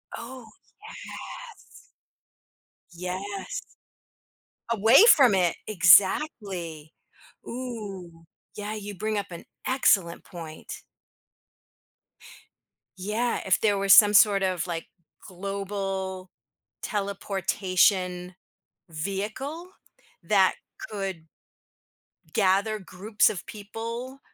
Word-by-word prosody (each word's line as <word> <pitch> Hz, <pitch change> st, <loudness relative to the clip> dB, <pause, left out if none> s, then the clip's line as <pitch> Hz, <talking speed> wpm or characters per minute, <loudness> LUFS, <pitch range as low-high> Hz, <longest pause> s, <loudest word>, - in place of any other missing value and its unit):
Oh, 250 Hz, 0 st, -9 dB
yes. 215 Hz, -, -23 dB, 2.3 s
Yes, 195 Hz, -, -5 dB, 1.1 s
away 225 Hz, -, +6 dB
from 255 Hz, -8 st, +5 dB
it, 180 Hz, -2 st, +2 dB
exactly. 185 Hz, -, +3 dB, 0.5 s
Ooh, 200 Hz, -9 st, -7 dB, 0.3 s
yeah, 210 Hz, +1 st, -5 dB
you 205 Hz, -1 st, -7 dB
bring 215 Hz, +2 st, -2 dB
up 200 Hz, -, -3 dB
an 170 Hz, -, -9 dB, 0.2 s
excellent 195 Hz, -10 st, +2 dB
point. 165 Hz, -3 st, -9 dB, 2.2 s
Yeah, 215 Hz, +6 st, -1 dB
if 190 Hz, -, +3 dB
there 205 Hz, -2 st, +2 dB
was 195 Hz, 0 st, +5 dB
some 205 Hz, 0 st, +8 dB
sort 200 Hz, -1 st, +5 dB
of, 185 Hz, -2 st, -1 dB
like, 165 Hz, -1 st, -4 dB, 0.4 s
global 195 Hz, -1 st, -4 dB, 0.5 s
teleportation 190 Hz, -2 st, 0 dB, 0.5 s
vehicle 215 Hz, -, -5 dB, 0.5 s
that 190 Hz, +1 st, +3 dB, 0.4 s
could 190 Hz, -6 st, -5 dB, 1.1 s
gather 200 Hz, +2 st, +2 dB
groups 195 Hz, +4 st, +1 dB
of 185 Hz, -, -6 dB
people, 230 Hz, +5 st, -7 dB
200 Hz, 80 wpm, -26 LUFS, 185-215 Hz, 2.3 s, some